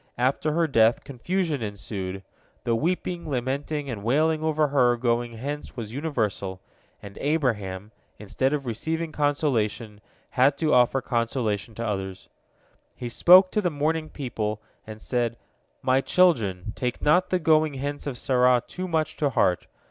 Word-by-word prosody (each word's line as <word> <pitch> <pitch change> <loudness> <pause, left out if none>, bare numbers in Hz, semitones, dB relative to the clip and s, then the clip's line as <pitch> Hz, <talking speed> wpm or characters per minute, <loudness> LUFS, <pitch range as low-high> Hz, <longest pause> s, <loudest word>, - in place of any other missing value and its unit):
After 130 +5 +1
her 170 +1 +2
death 115 -6 +3
confusion 155 +2 -2
ensued. 100 -2 -5 0.4
The 120 - 0
weeping, 175 +4 -2
lamenting, 140 +3 -2
and 110 -6 -5
wailing 155 +7 +2
over 155 -1 +1
her 125 -4 +3
going 120 0 0
hence 140 +6 -6
was 110 -2 -6
universal, 110 - -2 0.4
and 100 -1 -10
Abraham, 110 - -1 0.3
instead 130 +6 -1
of 145 -2 -2
receiving 160 +8 -3
consolation, 120 -8 -1 0.3
had 135 +2 +3
to 155 -1 +1
offer 125 +2 +4
consolation 115 -3 -2
to 115 - -4
others. 95 -3 -4 0.7
He 120 - -5
spoke 185 +9 +7
to 210 - +1
the 180 - +1
mourning 155 +1 -1
people, 110 -7 -4 0.3
and 110 0 -8
said: 120 0 -1 0.5
"My 130 +1 +3
children, 110 - +2
take 125 -1 -3
not 175 +5 +3
the 185 - +2
going 155 -3 +2
hence 145 +2 -4
of 130 -3 -4
Sarah 125 -1 +3
too 185 +1 -6
much 160 -3 -1
to 145 - +1
heart. 90 -8 +1
130 Hz, 150 wpm, -25 LUFS, 110-155 Hz, 0.7 s, spoke